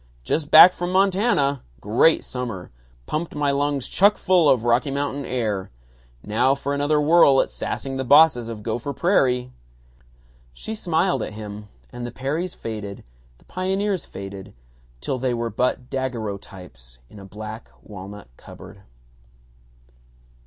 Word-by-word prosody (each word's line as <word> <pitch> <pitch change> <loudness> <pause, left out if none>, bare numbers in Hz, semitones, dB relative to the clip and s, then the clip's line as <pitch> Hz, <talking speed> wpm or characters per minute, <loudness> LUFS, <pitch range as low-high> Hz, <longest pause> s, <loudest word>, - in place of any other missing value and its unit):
"Just 150 - -2
back 180 +2 +9
from 175 0 -4
Montana. 185 - +2 0.2
Great 115 +10 +3
summer. 120 - -6 0.3
Pumped 160 +1 -4
my 145 -1 +1
lungs 140 -1 -1
chuck 205 +2 +3
full 180 -5 +3
of 120 -4 +3
Rocky 120 +4 +2
Mountain 140 0 -3
air. 110 -6 -2 0.5
Now 125 +6 +2
for 140 +1 -4
another 145 +1 +1
whirl 150 -3 +5
at - - 0
sassing 135 -1 -4
the 130 - -2
bosses 140 -3 +5
of 110 -2 -7
Gopher 120 +6 -3
Prairie." 125 -7 +1 1.0
She 220 - -6
smiled 185 -3 0
at - - -4
him, 105 -1 -8 0.2
and 120 - -8
the 120 - -5
Perrys 150 +9 -3
faded, 105 -3 -7 0.3
the - - -26
pioneers 190 +1 -2
faded, 95 -3 -9 0.5
till 130 - -3
they 125 -1 -1
were 115 -1 -3
but 125 +3 -1
daguerreotypes 100 - -6
in 105 - -14
a - - -11
black 110 +3 -9
walnut 100 - -10
cupboard. - - -13
130 Hz, 140 wpm, -22 LUFS, 110-155 Hz, 1.0 s, back